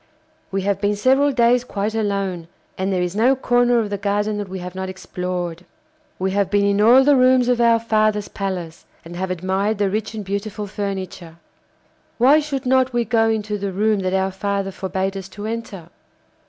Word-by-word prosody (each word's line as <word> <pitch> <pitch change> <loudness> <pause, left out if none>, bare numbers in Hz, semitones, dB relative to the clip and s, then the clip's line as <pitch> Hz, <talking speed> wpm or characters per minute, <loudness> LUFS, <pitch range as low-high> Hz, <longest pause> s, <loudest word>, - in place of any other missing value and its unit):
We 195 0 -2
have 200 0 -1
been 205 0 +1
several 265 +7 +3
days 245 -1 +3
quite 210 -3 -3
alone, 200 -6 -2 0.3
and 190 +1 -2
there 180 -1 0
is 180 +1 -3
no 245 +5 +4
corner 245 -1 +2
of 215 -3 -1
the 200 - -2
garden 205 +1 -1
that 205 -2 -5
we 190 - -5
have 180 -1 -7
not 190 0 -4
explored. 180 -2 -5 0.5
We 190 +1 -1
have 200 0 0
been 205 -1 +2
in 200 0 +2
all 245 +5 +7
the 290 +1 +5
rooms 255 -1 +4
of 245 -1 +2
our 230 -1 +5
father's 215 -2 +1
palace, 180 -5 -5 0.2
and 170 +1 -9
have 190 +1 -3
admired 190 +4 -1
the 200 -2 0
rich 215 +2 -3
and 210 -2 -5
beautiful 200 +2 -4
furniture: 190 -4 -5 0.8
why 270 +6 +5
should 285 -3 -4
not 260 0 +2
we 240 -1 +1
go 225 -1 +2
into 210 -1 -2
the 200 0 -3
room 210 +2 +1
that 185 0 -1
our 190 0 0
father 195 0 -2
forbad 190 +1 -3
us 190 -1 -7
to 205 +1 -8
enter? 215 -6 -6
205 Hz, 195 wpm, -21 LUFS, 190-230 Hz, 0.8 s, all